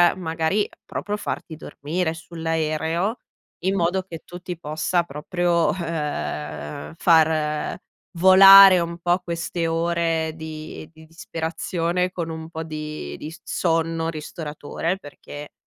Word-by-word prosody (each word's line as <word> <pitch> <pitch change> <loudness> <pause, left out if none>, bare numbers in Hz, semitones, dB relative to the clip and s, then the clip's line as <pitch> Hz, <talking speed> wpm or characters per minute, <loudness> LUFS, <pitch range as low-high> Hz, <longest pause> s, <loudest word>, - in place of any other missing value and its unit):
magari, 165 +3 0 0.2
proprio 210 0 -3
farti 165 -5 -5
dormire 160 +3 -3
sull'aereo, 165 +4 -2 0.5
in 190 +2 +1
modo 185 +1 +1
che 165 -4 -9
tu 175 - -9
ti 180 -1 -6
possa 155 +3 0
proprio, 170 +3 0
ehm, 145 - -4
far 155 -2 +2 0.4
volare 190 +1 +10
un 170 0 -4
po' 175 +1 +2
queste 170 0 -3
ore 165 -1 0
di 155 -1 -8
di 160 0 -16
disperazione 170 +2 -2
con 170 -3 -4
un 160 0 -6
po' 160 - -5
di 150 - -6
di 155 - -7
s 165 - -12
sonno 165 -1 0
ristoratore. 155 +2 -4
Perché 145 -2 -10
165 Hz, 120 wpm, -23 LUFS, 155-175 Hz, 0.5 s, volare